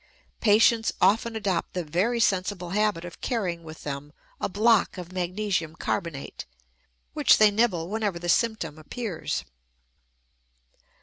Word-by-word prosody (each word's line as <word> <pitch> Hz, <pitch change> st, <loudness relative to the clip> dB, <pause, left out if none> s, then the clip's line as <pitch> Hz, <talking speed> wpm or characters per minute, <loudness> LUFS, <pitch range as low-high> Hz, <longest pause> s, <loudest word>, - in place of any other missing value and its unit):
Patients 225 Hz, +1 st, +4 dB
often 225 Hz, +5 st, +3 dB
adopt 200 Hz, -5 st, -1 dB
the 180 Hz, -, -2 dB
very 185 Hz, +10 st, 0 dB
sensible 185 Hz, -4 st, 0 dB
habit 210 Hz, -4 st, +1 dB
of 175 Hz, -, -10 dB
carrying 185 Hz, -9 st, -2 dB
with 160 Hz, 0 st, -11 dB
them 145 Hz, +1 st, -6 dB, 0.3 s
a -, -, -1 dB
block 215 Hz, +1 st, +3 dB
of 180 Hz, -1 st, -8 dB
magnesium 180 Hz, -2 st, -2 dB
carbonate, 165 Hz, -6 st, -4 dB, 0.7 s
which -, -, +5 dB
they 215 Hz, -1 st, +6 dB
nibble 205 Hz, -6 st, +1 dB
whenever 205 Hz, -2 st, -2 dB
the 175 Hz, 0 st, -6 dB
symptom 175 Hz, -6 st, 0 dB
appears. 185 Hz, +3 st, -4 dB
185 Hz, 125 wpm, -26 LUFS, 170-215 Hz, 0.7 s, they